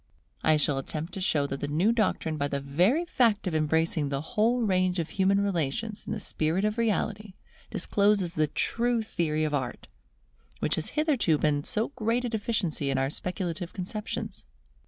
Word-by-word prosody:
I 155 -1 +5
shall 145 -2 +1
attempt 155 +5 -5
to 190 - -5
show 155 -7 +2
that 135 -1 -4
the 145 - -2
new 165 +9 +2
doctrine 210 -8 0
by 145 -1 0
the 140 -1 -2
very 180 - +2
fact 230 - +2
of 180 - -1
embracing 155 0 +1
the 140 -1 -1
whole 240 +2 +3
range 185 -4 +2
of 170 -2 -2
human 195 +1 +2
relations 200 +3 -2
in - - -3
the 215 - -3
spirit 170 +1 0
of 215 +2 -1
reality, 210 -3 -1 0.3
discloses 200 -2 +1
the 155 -4 +2
true 235 +7 0
theory 160 -7 -1
of 155 -1 -1
Art, 130 -4 -3 0.7
which - - 0
has 160 - -1
hitherto 280 - +3
been 145 -1 +1
so 215 +8 0
great 245 -2 -1
a - - -1
deficiency 205 -10 -1
in 135 - +1
our 135 +1 0
speculative 180 0 -4
conceptions. 205 +3 -4
185 Hz, 175 wpm, -28 LUFS, 155-215 Hz, 0.7 s, I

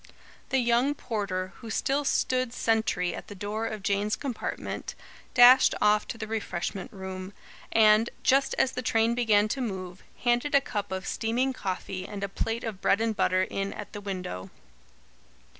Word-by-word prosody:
The 265 - +2
young 245 +3 +2
porter, 200 -7 -3
who 230 - -9
still 275 +6 0
stood 255 -2 +1
sentry 220 -7 +1
at - - -8
the 205 - -9
door 210 +3 -3
of 215 -3 -6
Jane's 200 +1 +1
compartment, 260 -6 -5 0.4
dashed 250 +1 +8
off 210 0 +3
to - - -5
the 220 - -4
refreshment 205 -4 -4
room; 190 0 -7 0.4
and, 220 +1 +5
just 270 +1 +3
as 265 - +2
the 255 - -4
train 225 -1 +2
began 215 -3 +3
to 270 - -2
move, 190 -5 -5 0.2
handed 240 +4 +2
a - - +8
cup 205 -7 -4
of 190 0 -3
steaming 245 +4 0
coffee 185 -3 -4
and 200 -1 -6
a 200 - -2
plate 225 +4 -2
of 215 -5 -5
bread 200 - +3
and 225 -1 0
butter 185 -2 +2
in 195 +1 -3
at 210 - -9
the 205 - -6
window. 180 - -5
215 Hz, 170 wpm, -28 LUFS, 195-240 Hz, 0.4 s, dashed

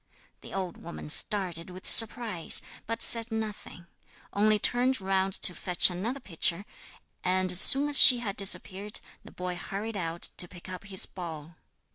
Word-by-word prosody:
The - - -13
old 185 -2 -6
woman 170 -2 -10
started 180 0 0
with 185 +1 -13
surprise, 225 -6 +4 0.2
but 230 +1 -4
said 230 0 -1
nothing; 215 -5 -7 0.5
only 215 +1 +1
turned 250 +5 -1
round 190 0 -2
to 180 - +2
fetch 180 +2 +3
another 220 +10 -5
pitcher, 180 -3 -2 0.6
and 185 0 0
as 180 +1 +5
soon 280 +2 +6
as 290 -1 +7
she 250 - +8
had 210 -5 -6
disappeared, 195 +1 -2 0.2
the - - -15
boy 180 0 -6
hurried 205 +5 -7
out 170 -3 -6
to 175 - -1
pick 175 +1 -15
up 185 +1 -9
his 195 -1 +1
ball. 165 -3 -10
190 Hz, 160 wpm, -27 LUFS, 180-220 Hz, 0.6 s, she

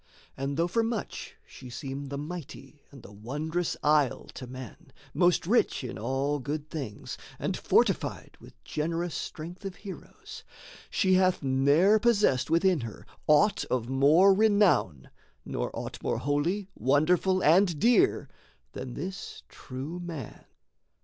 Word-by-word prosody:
And 135 +1 -3
though 170 +1 +2
for 230 +6 +1
much 225 -2 -4
she 125 - -12
seem 135 +2 -6
The 140 +1 -5
mighty 150 -1 -8
and 135 -4 -14
the - - -12
wondrous 150 +11 -3
isle 150 -3 +2
to 130 - -8
men, 130 +4 -10 0.2
Most 175 -2 +3
rich 215 - +2
in 125 - -6
all 135 +5 -1
good 150 +3 -5
things, 130 -10 -6 0.2
and - - -2
fortified - - 0
With - - -15
generous 165 - -2
strength 170 +5 -6
of 195 -2 -5
heroes, 200 -2 -10 0.5
she 190 -3 +2
hath 185 -3 +3
ne'er 140 +10 +4
Possessed 210 - +2
within 170 +1 +3
her 115 -4 -8 0.2
aught 175 +8 +4
of 120 -2 -2
more 150 +9 +5
renown, 200 - +2 0.3
Nor - - -3
aught - - -6
more - - -1
holy, 165 +8 -1
wonderful, 180 +7 +2
and 175 +1 +4
dear 245 - +3 0.4
Than 125 -2 -7
this 185 +5 -6
true 135 +7 -7
man. 165 -9 -7
155 Hz, 135 wpm, -28 LUFS, 135-185 Hz, 0.5 s, more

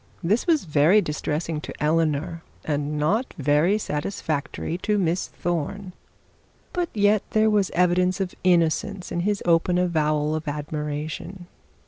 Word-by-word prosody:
This 210 - +1
was 320 - +3
very 155 +6 +4
distressing 150 -2 -2
to - - -7
Eleanor, 160 +1 0 0.2
and 150 0 -1
not 200 - 0
very 150 +7 +3
satisfactory 155 -3 -3
to 210 +2 0
Miss 180 -1 0
Thorne. 175 +3 -3 0.8
But 350 -1 -1
yet 205 0 +3
there 215 0 +4
was 205 -3 +2
evidence 180 +2 +2
of 190 -2 -2
innocence 180 +2 +1
in - - -1
his 200 +3 -1
open 175 +1 +3
avowal 155 -4 +1
of 155 0 -4
admiration. 150 +4 -4
170 Hz, 130 wpm, -24 LUFS, 150-195 Hz, 0.8 s, very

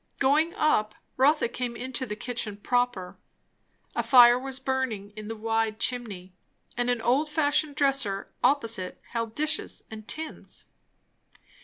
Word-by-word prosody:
Going 300 +5 +2
up, 215 -8 +2 0.2
Rotha 285 +1 +3
came 240 0 -4
into 255 +2 -4
the 210 - -4
kitchen 220 -2 -4
proper. 245 -4 -1 0.8
A - - +2
fire 245 -2 +7
was 265 0 -5
burning 260 -7 -2
in 215 0 -9
the 225 - -4
wide 225 0 -1
chimney, 205 -8 -2 0.4
and 245 0 0
an 245 -2 0
old 280 +6 +2
fashioned 295 -1 +1
dresser 275 -9 0
opposite 230 -9 0
held 230 -1 -3
dishes 305 +1 -2
and 215 -1 -9
tins. 315 0 -6
245 Hz, 135 wpm, -27 LUFS, 220-270 Hz, 0.8 s, fire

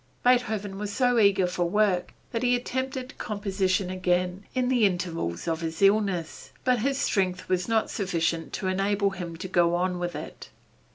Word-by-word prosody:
Beethoven 220 -6 +1
was 210 0 -3
so 245 +2 +2
eager 200 -3 +4
for 180 -1 -1
work 195 -2 +1 0.2
that 230 -2 -2
he 245 0 +3
attempted 260 +1 -4
composition 195 -4 -1
again 180 +1 0
in 255 -1 +1
the 250 -3 +2
intervals 175 - -1
of 165 0 -1
his 160 -1 -4
illness, 195 -5 +1
but 250 -2 +2
his 270 +4 0
strength 185 -9 0
was 180 -1 0
not 225 -1 +1
sufficient 165 -5 -1
to 195 - -3
enable 195 +2 +1
him 175 -3 -6
to 185 - -5
go 175 -1 +3
on 180 0 0
with 175 0 -3
it. - - -8
195 Hz, 170 wpm, -27 LUFS, 180-220 Hz, 0.2 s, eager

